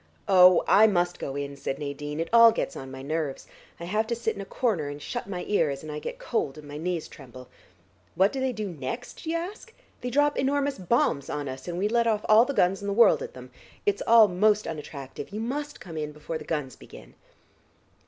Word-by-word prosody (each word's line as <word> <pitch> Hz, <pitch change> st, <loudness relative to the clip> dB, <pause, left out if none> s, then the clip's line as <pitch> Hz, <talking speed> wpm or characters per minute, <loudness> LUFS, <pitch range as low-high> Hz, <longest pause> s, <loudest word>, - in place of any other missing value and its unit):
"Oh, 180 Hz, -2 st, +7 dB
I 220 Hz, +2 st, +7 dB
must 175 Hz, -3 st, 0 dB
go 135 Hz, -, -5 dB
in," 140 Hz, 0 st, -4 dB
said 135 Hz, -, -4 dB
Nadine. 145 Hz, +1 st, -5 dB
"It 165 Hz, -, -2 dB
all 230 Hz, -1 st, +9 dB
gets 225 Hz, -, -3 dB
on 135 Hz, -, -7 dB
my 130 Hz, 0 st, -9 dB
nerves. 150 Hz, -1 st, -3 dB, 0.3 s
I -, -, -7 dB
have 215 Hz, +5 st, -1 dB
to 235 Hz, -, -1 dB
sit 230 Hz, -1 st, -2 dB
in -, -, -6 dB
a -, -, -7 dB
corner, 195 Hz, -, -1 dB
and 145 Hz, 0 st, -7 dB
shut 240 Hz, +6 st, -5 dB
my 180 Hz, -2 st, -4 dB
ears, 155 Hz, -9 st, 0 dB
and 155 Hz, -, -7 dB
I 150 Hz, -, -4 dB
get -, -, -6 dB
cold 135 Hz, +1 st, -2 dB
and 150 Hz, -1 st, -11 dB
my 145 Hz, 0 st, -7 dB
knees 170 Hz, -1 st, -2 dB
tremble. 130 Hz, -2 st, -13 dB, 0.7 s
What 190 Hz, +2 st, +3 dB
do 270 Hz, -, -3 dB
they 260 Hz, 0 st, 0 dB
do 215 Hz, -3 st, -4 dB
next, 170 Hz, -, -6 dB
do 320 Hz, -, -5 dB
you 335 Hz, -, +1 dB
ask? 400 Hz, +7 st, -7 dB, 0.3 s
They 250 Hz, -, -3 dB
drop 290 Hz, +3 st, +2 dB
enormous 280 Hz, -1 st, 0 dB
bombs 175 Hz, -, +1 dB
on 145 Hz, -1 st, -3 dB
us, 130 Hz, +2 st, -7 dB
and 175 Hz, 0 st, -4 dB
we 195 Hz, +3 st, +1 dB
let 235 Hz, +1 st, +2 dB
off 215 Hz, -2 st, 0 dB
all 220 Hz, +2 st, +7 dB
the 280 Hz, -, -3 dB
guns 185 Hz, +2 st, +2 dB
in 200 Hz, -, -5 dB
the 200 Hz, -, 0 dB
world 235 Hz, +3 st, +5 dB
at 485 Hz, 0 st, -7 dB
them. -, -, -11 dB, 0.3 s
It's 410 Hz, -1 st, +1 dB
all 225 Hz, -2 st, +8 dB
most 210 Hz, +3 st, +2 dB
unattractive. 145 Hz, -4 st, -7 dB
You 210 Hz, -, -6 dB
must 285 Hz, +6 st, -4 dB
come 165 Hz, -3 st, -9 dB
in 150 Hz, -1 st, -4 dB
before 150 Hz, +2 st, -6 dB
the -, -, -10 dB
guns 150 Hz, -5 st, -3 dB
begin." -, -, -14 dB
180 Hz, 230 wpm, -26 LUFS, 150-230 Hz, 0.7 s, all